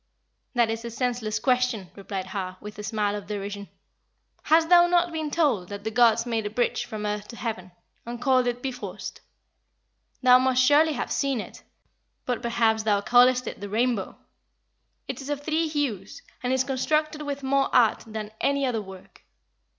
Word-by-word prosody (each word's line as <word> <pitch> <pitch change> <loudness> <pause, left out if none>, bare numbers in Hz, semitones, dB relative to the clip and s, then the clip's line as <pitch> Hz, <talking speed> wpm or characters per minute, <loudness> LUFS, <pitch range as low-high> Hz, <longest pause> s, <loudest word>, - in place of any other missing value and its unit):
"That 235 -2 +3
is 225 +1 -4
a 235 - -5
senseless 235 -2 -2
question," 250 -5 0
replied 195 -1 -5
Har, 185 -1 -5
with 210 0 -10
a - - -5
smile 205 0 -1
of 205 -1 -7
derision. 200 -1 -5 0.7
"Hast 320 +1 +4
thou 350 -1 +7
not 350 0 +2
been 315 -2 -2
told 285 - +1
that 200 0 -7
the 220 - -3
gods 230 0 +4
made 225 -3 -1
a - - -4
bridge 240 +3 -1
from 215 -3 -5
earth 210 0 -3
to 235 - -10
heaven, 215 -7 -5 0.3
and 235 0 -6
called 255 0 +3
it 245 0 -2
Bifrost? 260 -2 -6 1.0
Thou 250 0 +7
must 255 0 +3
surely 300 +4 +5
have - - -4
seen 275 -3 0
it; - - -8 0.6
but, 245 -2 -2
perhaps, 230 -2 +1
thou 210 -2 +1
callest 250 +3 +4
it - - -7
the 205 - -5
rainbow. 225 -1 -1 0.9
It - - -5
is 270 - -8
of 290 -1 -3
three 320 +2 0
hues, 270 - -3 0.2
and 250 0 -1
is 260 0 +2
constructed 305 +3 0
with 285 -1 -5
more 275 +1 +2
art 240 -4 +3
than 215 -1 -6
any 280 0 +1
other 235 -4 -1
work. 190 -2 -13
240 Hz, 180 wpm, -26 LUFS, 210-270 Hz, 1.0 s, thou